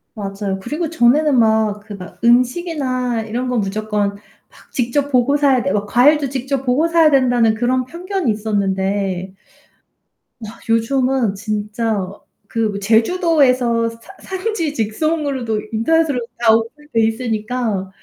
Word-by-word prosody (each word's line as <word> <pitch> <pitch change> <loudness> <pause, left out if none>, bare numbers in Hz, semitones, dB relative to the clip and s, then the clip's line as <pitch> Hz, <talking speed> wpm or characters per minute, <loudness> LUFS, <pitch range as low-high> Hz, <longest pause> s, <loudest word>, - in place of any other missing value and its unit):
맞아요. 195 -1 -4
그리고 300 - -3
전에는 285 0 +3
막 220 -2 +2
그 210 - -9
막 180 -2 -11
'음식이나 255 -1 +1
이런 240 +4 -3
거 250 - -1
무조건 205 0 -1 0.3
막 - - -21
직접 270 +4 -1
보고 255 +3 +3
사야 275 -4 +3
되고 200 +2 -1
과일도 275 +6 +3
직접 270 0 -3
보고 265 +6 +2
사야 330 -2 +4
된다.'는 245 -4 +3
그런 250 +2 0
편견이 350 - -2
있었는데 195 -3 -2 1.1
아 215 +2 -11
요즘은 245 -1 +1
진짜 210 -1 -2 0.4
그 225 0 -1
뭐 200 - -4
제주도에서 245 - +2
산 230 - -13 0.4
산지 370 -8 -2
직송으로도 255 0 -1
인터넷으로 290 +5 +1 0.2
다 230 -2 +5
오픈돼 230 +3 -1
있으니까 225 -3 -2
235 Hz, 285 characters per minute, -18 LUFS, 215-275 Hz, 1.1 s, 다